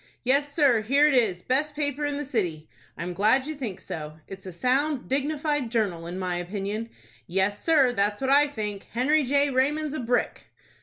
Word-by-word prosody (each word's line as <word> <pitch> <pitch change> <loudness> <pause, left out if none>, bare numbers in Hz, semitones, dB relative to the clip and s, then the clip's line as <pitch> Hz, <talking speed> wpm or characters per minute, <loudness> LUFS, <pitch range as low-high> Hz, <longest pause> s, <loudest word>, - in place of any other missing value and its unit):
"Yes, 280 +3 +2
sir. 280 -7 +3
Here 275 +7 +3
it 300 - +4
is. 210 -9 +2
Best 295 +4 0
paper 290 -1 -1
in 290 -1 -3
the 290 - -4
city!" 175 - -2 0.3
"I - - -4
am 180 +1 -4
glad 220 +8 +3
you 310 - -4
think 235 -10 -6
so. 155 -3 -7
It's 195 0 -9
a - - -5
sound, 260 - 0
dignified 290 -1 -1
journal, 195 -8 -1
in 175 +2 -5
my 180 -2 -2
opinion." 200 +5 -4 0.4
"Yes, 195 +3 0
sir. 290 -6 +4
That's 205 -1 0
what 265 0 0
I 290 +1 +6
think. 210 -7 -5
Henry 290 +6 +2
J. 280 +2 +2
Raymond's 290 +3 0
a 310 - -3
brick!" 245 0 -1
250 Hz, 195 wpm, -26 LUFS, 200-285 Hz, 0.4 s, I